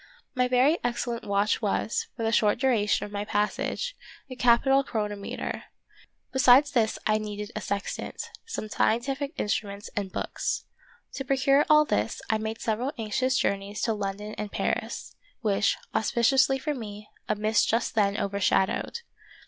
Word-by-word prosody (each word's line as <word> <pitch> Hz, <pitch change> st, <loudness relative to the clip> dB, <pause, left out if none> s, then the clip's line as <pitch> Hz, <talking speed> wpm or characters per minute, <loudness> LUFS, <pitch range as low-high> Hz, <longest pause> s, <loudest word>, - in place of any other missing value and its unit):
My 250 Hz, -1 st, +2 dB
very 255 Hz, +6 st, +3 dB
excellent 240 Hz, -1 st, -2 dB
watch 200 Hz, +2 st, +1 dB
was, 215 Hz, +1 st, -1 dB
for 230 Hz, -, -3 dB
the 225 Hz, -, +1 dB
short 210 Hz, -2 st, +3 dB
duration 230 Hz, -5 st, +2 dB
of 205 Hz, -, -10 dB
my 205 Hz, 0 st, -2 dB
passage, 210 Hz, -, -1 dB, 0.4 s
a -, -, -5 dB
capital 250 Hz, +3 st, +4 dB
chronometer. 210 Hz, -5 st, -4 dB, 0.7 s
Besides 265 Hz, +2 st, +6 dB
this 225 Hz, -5 st, +1 dB
I 215 Hz, 0 st, +3 dB
needed 210 Hz, 0 st, -5 dB
a 215 Hz, -, -3 dB
sextant, 200 Hz, +1 st, -4 dB, 0.2 s
some 335 Hz, -, -4 dB
scientific 270 Hz, +7 st, 0 dB
instruments 205 Hz, -1 st, -2 dB
and 200 Hz, -2 st, -2 dB
books. -, -, -2 dB, 0.5 s
To 270 Hz, -, -4 dB
procure 275 Hz, +1 st, +3 dB
all 305 Hz, 0 st, +7 dB
this, 105 Hz, -, -1 dB
I 220 Hz, -, +1 dB
made 220 Hz, +1 st, -4 dB
several 235 Hz, +5 st, -1 dB
anxious 255 Hz, +4 st, 0 dB
journeys 200 Hz, +1 st, -1 dB
to 225 Hz, -, +2 dB
London 205 Hz, +1 st, -4 dB
and 210 Hz, -1 st, -4 dB
Paris, -, -, -2 dB, 0.3 s
which, 205 Hz, -2 st, +2 dB, 0.2 s
auspi 220 Hz, +2 st, 0 dB
ciously 270 Hz, +1 st, +4 dB
for 300 Hz, +3 st, -2 dB
me, 210 Hz, -5 st, -8 dB, 0.2 s
a 215 Hz, -, +2 dB
mist 215 Hz, +1 st, +2 dB
just 230 Hz, +2 st, +1 dB
then 205 Hz, -2 st, +2 dB
overshadowed. 200 Hz, -, 0 dB
220 Hz, 150 wpm, -27 LUFS, 205-255 Hz, 0.7 s, all